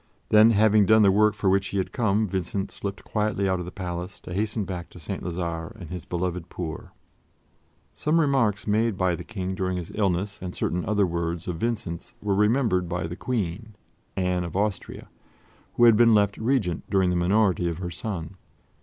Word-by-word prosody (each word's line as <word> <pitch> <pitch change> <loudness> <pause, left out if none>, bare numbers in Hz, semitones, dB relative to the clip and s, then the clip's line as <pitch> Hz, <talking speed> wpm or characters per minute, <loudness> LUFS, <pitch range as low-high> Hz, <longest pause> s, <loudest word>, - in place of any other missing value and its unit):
Then, 110 +1 +7
having 105 -2 +4
done 110 +1 +6
the 100 - +6
work 105 +2 +3
for 105 - -2
which 95 0 +3
he 100 - -3
had 95 - -1
come, 110 -2 +1
Vincent 95 0 -3
slipped 100 0 -5
quietly 105 -2 -1
out 95 -1 +1
of 90 - -4
the 90 - -7
palace 90 0 -5
to 85 - -8
hasten 105 +2 -1
back 90 -3 -6
to - - -13
St. 95 +4 -5
Lazare 85 -2 -4
and 85 -5 -9
his 90 -2 -6
beloved 90 0 -3
poor. 80 -3 -6 1.0
Some 155 +2 +1
remarks 130 -9 +2
made 110 0 +1
by 95 -1 +2
the 90 - -5
King 95 -1 -4
during 95 -1 -2
his 85 -2 -6
illness 100 -1 -1
and 90 -1 -5
certain 90 0 -1
other 105 -1 +2
words 85 -1 -3
of 90 -2 -3
Vincent's 100 -5 -3
were 100 -1 -1
remembered 105 -3 +2
by 85 -2 -2
the 85 +1 -5
Queen, 110 -1 -3 0.4
Anne 90 -1 0
of 85 -1 -6
Austria, 105 -1 -2 0.7
who 120 - +3
had 115 -2 +8
been 115 0 +6
left 100 -1 +3
Regent 110 - 0
during 95 -2 +2
the - - 0
minority 90 0 +2
of 85 - -4
her 90 -1 -5
son. 90 -2 -5
95 Hz, 195 wpm, -25 LUFS, 90-105 Hz, 1.0 s, had